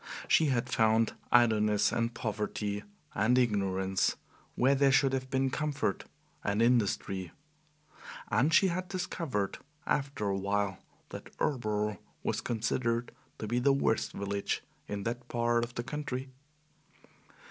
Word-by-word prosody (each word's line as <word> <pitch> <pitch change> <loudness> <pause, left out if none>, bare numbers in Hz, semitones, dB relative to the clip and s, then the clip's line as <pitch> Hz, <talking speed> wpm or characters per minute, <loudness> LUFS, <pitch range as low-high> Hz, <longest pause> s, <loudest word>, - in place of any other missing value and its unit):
She 160 - +4
had 125 -4 +1
found 110 0 +3 0.2
idleness 110 -3 +4
and 115 0 0
poverty 105 -2 -3 0.3
and 110 +6 +3
ignorance 95 -5 +1 0.4
where 130 +2 +4
there 140 0 +4
should 135 0 +4
have 130 0 -2
been 135 0 +1
comfort 150 0 -1 0.4
and 100 +1 0
industry. 100 -6 +1 1.0
And 130 +9 +3
she 190 +4 +5
had 180 +1 -2
discovered, 165 - -2 0.3
after 135 -5 -1
a 100 -1 0
while, 100 0 -1 0.3
that - - -8
Erleboro 105 -6 -1 0.2
was - - -1
considered 115 +1 -1 0.3
to - - -5
be 120 +3 0
the 135 +2 +4
worst 135 -4 +1
village 100 0 -2 0.2
in 100 -1 -4
that 120 +2 -4
part 120 0 +1
of 120 0 -6
the 120 - -2
country. 135 -1 -4
115 Hz, 130 wpm, -31 LUFS, 105-130 Hz, 1.0 s, she